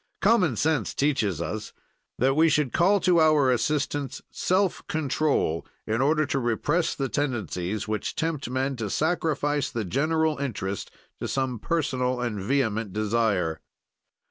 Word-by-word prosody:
"Common 190 - +3
sense 145 -2 0
teaches 110 - +1
us 110 +4 -5 0.4
that 135 +2 +2
we 160 +2 +5
should 150 -5 +1
call 195 +4 +4
to 175 -2 +4
our 150 -4 +4
assistance 145 +1 -1
self 185 0 +1
control, 145 - 0 0.2
in 115 +3 0
order 155 +2 +3
to 135 - -1
repress 140 +8 0
the 135 - -1
tendencies 110 - -2
which 110 0 -2
tempt 160 -5 -2
men 130 +2 -1
to 110 -3 -3
sacrifice 150 - 0
the 115 -3 -3
general 155 - +1
interest 100 -8 -3 0.3
to - - -3
some 130 -3 -1
personal 130 -4 -1
and 120 -4 -2
vehement 110 -3 0
desire. 105 -6 0
135 Hz, 140 wpm, -26 LUFS, 110-155 Hz, 0.4 s, we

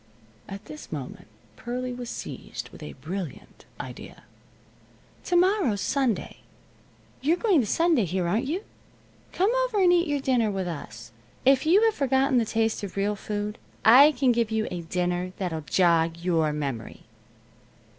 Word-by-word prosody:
At 195 +1 -8
this 155 -1 -10
moment 140 -5 -7 0.3
Pearlie 250 - -4
was 245 -1 -6
seized - - -7
with - - -14
a 75 - -7
brilliant 165 +1 -7
idea. - - -9 1.0
"To 355 - 0
morrow's 355 - +3
Sunday. 260 -2 -1 0.8
You're 315 +6 +2
going 390 -6 +3
to 230 - 0
Sunday 325 - +2
here, 180 0 -1
aren't 220 +9 0
you? 355 +8 -2 0.7
Come 385 +5 +2
over - - -1
and 360 -2 +5
eat 345 0 +3
your 290 -1 0
dinner 250 -5 +1
with 190 -2 -3
us. 115 -9 -8 0.3
If 270 +3 +4
you 385 +7 +5
have 450 -1 +4
forgotten 270 -2 +2
the 230 - +1
taste 225 0 0
of 200 -1 -7
real 205 +1 0
food, 210 +1 -4 0.3
I 270 +7 +8
can 260 -1 +2
give 235 -2 +1
you 220 -1 -1
a 175 - -4
dinner 180 +2 -2
that'll 170 -5 -3
jog 165 0 +2
your 165 -3 +1
memory." 140 -6 -5
220 Hz, 155 wpm, -26 LUFS, 175-275 Hz, 1.0 s, I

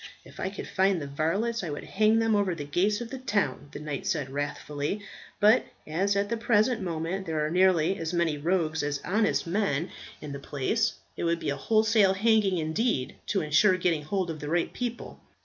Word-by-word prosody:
"If - - -14
I 190 - -1
could 200 - -7
find 190 -1 +2
the 145 - -5
varlets, 190 +11 -1
I 170 - -3
would 145 - -5
hang 215 +2 +2
them 225 -1 +2
over 200 -4 +1
the 150 - -5
gates 200 +9 +1
of 235 - -6
the 265 - -5
town," 205 - -1
the - - -7
knight 150 +5 -5
said 150 -9 -1
wrathfully. 145 +5 -3 0.4
"But 215 +4 +5 0.2
as 190 +6 0
at 200 0 +1
the 230 +2 -2
present 225 0 +2
moment 175 +2 -3
there 155 -2 0
are 155 - -2
nearly 185 0 +3
as 165 0 -3
many 170 -3 +1
rogues 160 0 0
as 145 -1 -2
honest 215 +2 +1
men 175 -4 -1 0.3
in 150 - -7
the 140 - -5
place, 150 - 0 0.2
it - - -4
would 170 0 +2
be 145 - -2
a - - -1
wholesale 215 -2 +3
hanging 210 -2 +3
indeed 160 - 0
to 195 - +1
ensure 160 +6 +4
getting 170 -4 +1
hold 180 +3 -2
of 155 - -7
the 150 - -5
right 170 +1 0
people. 240 -1 -5
185 Hz, 205 wpm, -28 LUFS, 155-210 Hz, 0.4 s, But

